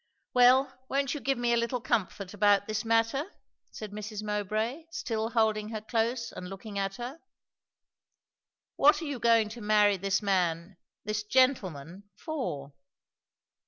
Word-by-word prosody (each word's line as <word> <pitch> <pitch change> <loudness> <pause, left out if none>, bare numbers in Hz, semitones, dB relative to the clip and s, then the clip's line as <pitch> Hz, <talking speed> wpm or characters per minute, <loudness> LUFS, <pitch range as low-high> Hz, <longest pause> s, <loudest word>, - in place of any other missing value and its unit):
"Well, 255 +2 +5 0.2
won't 275 -1 0
you 295 - -4
give 270 -1 0
me 240 0 +1
a - - +3
little 235 +2 -1
comfort 210 -4 -2
about 205 0 +3
this 215 0 -2
matter?" 230 - +1 0.4
said 215 -2 -8
Mrs. 210 0 -6
Mowbray, 215 - -2
still 225 -8 -3
holding 220 -2 +1
her 220 -1 -4
close 230 +1 -1
and 180 - -8
looking 200 +1 -6
at 195 0 -2
her. 250 +6 -7 1.6
"What 295 +2 +5
are - - -4
you 285 -4 -4
going 230 -2 +4
to 230 +2 -9
marry 210 -1 +4
this 195 +1 0
man 180 -2 0 0.3
this 215 0 -1
gentleman 200 - 0
for?" 150 - -5
220 Hz, 145 wpm, -29 LUFS, 200-245 Hz, 1.6 s, Well